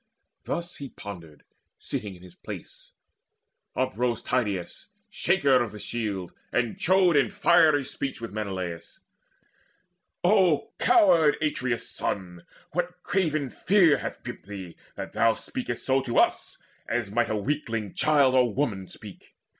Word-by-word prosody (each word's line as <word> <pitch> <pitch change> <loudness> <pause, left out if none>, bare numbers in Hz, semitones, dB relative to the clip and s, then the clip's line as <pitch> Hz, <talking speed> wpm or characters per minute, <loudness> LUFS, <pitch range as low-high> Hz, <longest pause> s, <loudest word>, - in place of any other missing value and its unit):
Thus 170 +1 -3
as - - -12
he 140 -2 -7
pondered, 85 -10 -10 0.3
sitting 100 -2 -4
in 90 - -16
his 90 -2 -13
place, - - -9 0.8
Uprose 120 +3 -1
Tydeides, 105 -8 -2 0.2
shaker 155 -10 +3
of 115 -3 -3
the 105 - -8
shield, 100 -6 -4 0.2
And 120 -2 0
chode 185 -2 +4
in 140 - +4
fiery 170 -8 +4
speech 135 +1 -4
with 115 -3 -7
Menelaus: 95 -5 -5 1.2
"O 180 -5 +3
coward 170 - +5
Atreus' 130 -6 -1
son, 90 -3 -4 0.2
what 180 +1 -3
craven 155 -8 0
fear 180 -8 +4
Hath - - -6
gripped - - -8
thee, 95 -4 -8 0.2
that - - -7
thou 115 -1 +3
speakest 260 -2 -5
so 135 0 +3
to 120 -2 -3
us - - +2 0.3
As 120 -4 -1
might 120 +3 +1
a 110 - 0
weakling 115 -3 -2
child 145 -4 +3
or 125 -3 +4
woman 105 -7 -2
speak? 105 0 -13
125 Hz, 140 wpm, -26 LUFS, 100-155 Hz, 1.2 s, coward